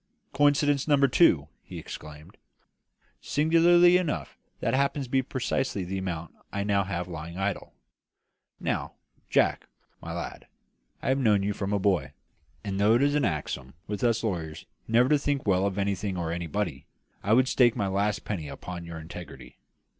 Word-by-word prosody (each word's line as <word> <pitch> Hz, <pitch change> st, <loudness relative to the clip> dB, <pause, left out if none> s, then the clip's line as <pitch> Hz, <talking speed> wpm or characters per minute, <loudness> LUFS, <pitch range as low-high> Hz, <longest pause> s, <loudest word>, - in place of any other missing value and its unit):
"Coincidence 145 Hz, 0 st, +3 dB
number 140 Hz, -2 st, +5 dB
two!" 105 Hz, -, +4 dB
he -, -, -10 dB
exclaimed. 75 Hz, 0 st, -10 dB, 0.9 s
"Singularly 170 Hz, +3 st, +5 dB
enough, 175 Hz, -5 st, -3 dB, 0.2 s
that -, -, -1 dB
happens 140 Hz, +1 st, +1 dB
to 125 Hz, -, -15 dB
be 135 Hz, -, +3 dB
precisely 130 Hz, -5 st, -2 dB
the 95 Hz, +2 st, -3 dB
amount 85 Hz, -3 st, -5 dB, 0.2 s
I 100 Hz, -, -2 dB
now 100 Hz, -1 st, +2 dB
have 90 Hz, -2 st, -3 dB
lying 85 Hz, 0 st, -7 dB
idle. 95 Hz, 0 st, -3 dB, 0.8 s
Now, -, -, -2 dB, 0.4 s
Jack, -, -, +2 dB, 0.3 s
my -, -, -7 dB
lad, -, -, -6 dB, 0.6 s
I -, -, 0 dB
have 135 Hz, +1 st, +2 dB
known 105 Hz, -6 st, +3 dB
you 105 Hz, +1 st, 0 dB
from 100 Hz, 0 st, -3 dB
a 105 Hz, -, +2 dB
boy; 90 Hz, -9 st, +1 dB, 0.5 s
and, 100 Hz, -2 st, -3 dB
though 105 Hz, +3 st, +5 dB
it 125 Hz, -, +3 dB
is 145 Hz, 0 st, +3 dB
an 150 Hz, -2 st, +2 dB
axiom 70 Hz, -6 st, -3 dB
with 105 Hz, +1 st, -4 dB
us 115 Hz, -1 st, +2 dB
lawyers 80 Hz, -7 st, -3 dB, 0.2 s
never 120 Hz, +3 st, +4 dB
to 150 Hz, +1 st, +3 dB
think 140 Hz, -1 st, -1 dB
well 95 Hz, -1 st, +2 dB
of 100 Hz, -1 st, -4 dB
anything 100 Hz, -1 st, -1 dB
or 85 Hz, -2 st, -2 dB
anybody, 85 Hz, -3 st, -3 dB, 0.3 s
I 105 Hz, -, +1 dB
would 130 Hz, +2 st, +5 dB
stake 125 Hz, -3 st, +4 dB
my 100 Hz, -, -1 dB
last 100 Hz, +2 st, -1 dB
penny 85 Hz, -8 st, -3 dB
upon 85 Hz, +5 st, -7 dB
your 85 Hz, -1 st, -7 dB
integrity. 85 Hz, +2 st, -10 dB
100 Hz, 170 wpm, -27 LUFS, 90-130 Hz, 0.9 s, number